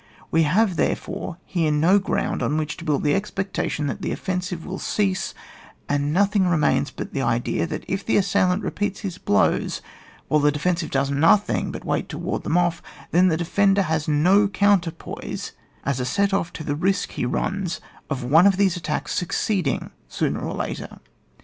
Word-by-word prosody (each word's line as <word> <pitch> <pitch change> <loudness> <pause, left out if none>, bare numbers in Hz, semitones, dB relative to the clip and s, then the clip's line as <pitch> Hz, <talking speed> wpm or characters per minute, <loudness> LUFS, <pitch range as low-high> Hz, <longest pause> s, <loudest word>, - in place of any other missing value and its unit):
We 165 - +4
have, 190 +1 +2
therefore, 170 - -2
here 165 -4 0
no 165 +7 +4
ground 195 - -1
on 150 - 0
which 155 0 -2
to - - -9
build 150 -4 0
the 145 -1 +3
expec 195 0 -2
tation 150 - -1
that - - -4
the - - -2
offensive 180 -2 -3
will 190 +1 -5
cease, 195 -3 -1 0.5
and 145 0 0
nothing 200 +2 +3
remains 150 -4 +2
but - - -7
the 135 - -1
idea 120 +5 0
that 160 - -5
if 195 +1 -2
the - - +2
assailant 200 -1 +2
repeats 205 -1 -2
his 185 -4 -5
blows, 100 - +1 0.5
whilo 150 - +3
the 145 0 +4
de 145 - -4
fensive 170 +1 0
does 135 +1 0
nothing 165 +9 +3
but - - -8
wait - - -1
to - - -5
ward - - -3
them - - -3
off^ 175 -1 +2 0.3
then 180 +2 +5
the 160 -3 +2
defender 195 +3 +2
has 160 -3 -1
no 180 +8 +4
coun 200 -1 +3
terpoise 165 -1 -6 0.3
as 140 -2 0
a 125 - -1
set 200 +10 +1
off 180 -4 0
to 155 - -6
the 145 -1 -2
risk 190 +5 0
he - - -3
runs 175 +6 -2 0.3
of 135 -4 -2
one 160 +9 +6
of 195 -2 +3
these 195 -3 +3
attacks 150 -4 -3
succeeding 180 -3 -1 0.2
sooner - - -1
or - - -4
later. - - -5
175 Hz, 190 wpm, -23 LUFS, 150-195 Hz, 0.5 s, one